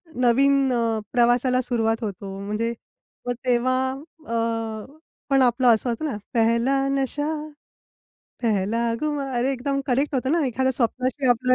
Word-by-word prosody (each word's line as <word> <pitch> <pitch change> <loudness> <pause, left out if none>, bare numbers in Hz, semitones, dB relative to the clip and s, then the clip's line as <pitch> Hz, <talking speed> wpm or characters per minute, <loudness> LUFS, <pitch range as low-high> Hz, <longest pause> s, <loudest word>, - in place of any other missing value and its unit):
नवीन 265 +2 +3
अ, 230 -2 0
प्रवासाला 245 +1 +3
सुरुवात 225 -2 0
होतो. 195 -1 -5
म्हणजे 220 +3 -1 0.5
मग 245 - +1
तेव्हा 255 +1 +1 0.4
अ, 225 -2 -2 0.4
पण 270 -1 +4
आपलं 250 0 +3
असं 240 +3 -3
होतं 235 +7 -2
ना, 265 -9 -2 0.2
पहला 235 +3 +2
नशा 275 +2 -1 1.2
पहला 215 0 +1 0.2
खुमार. 290 -3 -2
अरे 250 +3 +1
एकदम 275 +2 -2
करेक्ट 275 +3 0
होतं 260 +1 0
ना 330 -2 +2
एखाद्या 260 +1 0
स्वप्नाशी 255 +2 -1
आपलं 255 +1 +3
245 Hz, 135 wpm, -24 LUFS, 230-265 Hz, 1.2 s, पण